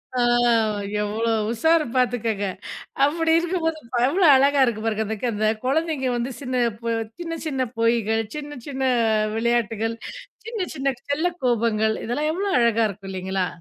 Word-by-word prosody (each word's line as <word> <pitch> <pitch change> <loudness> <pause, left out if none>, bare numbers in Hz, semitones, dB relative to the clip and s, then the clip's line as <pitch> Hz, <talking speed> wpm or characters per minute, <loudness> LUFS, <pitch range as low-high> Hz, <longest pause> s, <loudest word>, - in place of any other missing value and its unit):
ஆ, - - 0 0.8
எவ்ளோ 220 +2 -1 0.2
உஷாரு 320 +7 +3
பாத்துக்கோங்க, 230 -5 0 0.6
அப்டி 320 +3 +1
இருக்கும்போது 335 -2 -1 0.3
எவ்ளோ 350 +8 +2
அழகா 280 +1 +4
இருக்கு 235 -4 -1
பாருங்க. 220 -1 0
அதுக்கு 220 +3 -3
அந்த 215 0 0 0.2
குழந்தைங்க 295 0 0
வந்து, 240 +2 -2
சின்ன 255 -2 -1 0.2
பொ 235 - -9 0.3
சின்ன 330 -1 -4
சின்ன 265 -4 -1
பொய்கள், 230 -1 +2
சின்ன 295 -1 -6
சின்ன 270 -2 -4 0.5
விளையாட்டுகள், 225 -1 0 0.5
சின்ன 455 -2 -5
சின்ன 275 -2 -1
செல்ல 295 +4 0 0.2
கோபங்கள், 220 -3 +1
இதெல்லாம் 295 +7 -1
எவ்ளோ 395 +4 -2
அழகா 230 -1 +3
இருக்கும் 195 0 -9
இல்லிங்களா? 190 0 -2
245 Hz, 135 wpm, -23 LUFS, 225-300 Hz, 0.8 s, அழகா